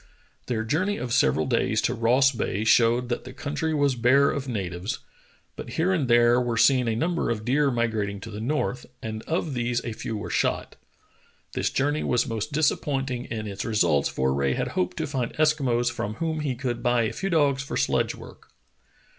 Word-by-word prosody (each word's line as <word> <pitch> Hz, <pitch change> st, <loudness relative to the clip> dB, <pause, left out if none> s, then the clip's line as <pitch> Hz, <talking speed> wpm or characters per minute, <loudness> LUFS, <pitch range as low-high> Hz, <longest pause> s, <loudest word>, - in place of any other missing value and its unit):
Their 115 Hz, -3 st, -1 dB
journey 185 Hz, -, 0 dB
of 120 Hz, -2 st, -3 dB
several 125 Hz, -, +3 dB
days 115 Hz, -3 st, +1 dB
to 120 Hz, -, +1 dB
Ross 125 Hz, +3 st, +3 dB
Bay 110 Hz, -4 st, -2 dB
showed 120 Hz, +2 st, +4 dB
that 120 Hz, -, -2 dB
the -, -, -10 dB
country 150 Hz, +2 st, -3 dB
was 145 Hz, -3 st, +2 dB
bare 130 Hz, +4 st, +4 dB
of 140 Hz, -1 st, -4 dB
na 115 Hz, -5 st, -2 dB
tives, 90 Hz, +2 st, -4 dB, 0.6 s
but -, -, -8 dB
here 180 Hz, +4 st, +1 dB
and 155 Hz, -8 st, 0 dB
there 120 Hz, +1 st, +5 dB
were 120 Hz, -2 st, -1 dB
seen 125 Hz, -1 st, +4 dB
a 115 Hz, -, 0 dB
number 170 Hz, +8 st, 0 dB
of 110 Hz, -2 st, -2 dB
deer 140 Hz, +3 st, +2 dB
migrating 110 Hz, -5 st, -1 dB
to 115 Hz, -, -8 dB
the 105 Hz, +1 st, -6 dB
north, 125 Hz, -1 st, -2 dB, 0.2 s
and 110 Hz, -1 st, -4 dB
of 160 Hz, -2 st, -1 dB
these 120 Hz, -1 st, 0 dB
a 115 Hz, -, -3 dB
few 110 Hz, 0 st, -5 dB
were 105 Hz, -, -6 dB
shot. -, -, -1 dB, 0.8 s
This -, -, 0 dB
journey 145 Hz, +3 st, 0 dB
was 120 Hz, 0 st, +1 dB
most 115 Hz, +3 st, -3 dB
disappointing 135 Hz, -4 st, 0 dB
in 110 Hz, -2 st, -5 dB
its 100 Hz, -1 st, -5 dB
results 75 Hz, -10 st, +2 dB
for 65 Hz, 0 st, 0 dB
Rae 70 Hz, -1 st, 0 dB
had -, -, -2 dB
hoped 90 Hz, 0 st, -2 dB
to -, -, -1 dB
find 130 Hz, -4 st, -3 dB
Eskimos 135 Hz, -6 st, +2 dB
from 110 Hz, -2 st, -4 dB
whom 160 Hz, +3 st, -2 dB
he 145 Hz, -4 st, -2 dB
could 120 Hz, -1 st, -3 dB
buy 120 Hz, -1 st, +2 dB
a 110 Hz, -, -2 dB
few 195 Hz, -, -3 dB
dogs 145 Hz, -5 st, +2 dB
for 135 Hz, -, -4 dB
sledge -, -, +1 dB
work. -, -, -14 dB
120 Hz, 200 wpm, -25 LUFS, 110-140 Hz, 0.8 s, there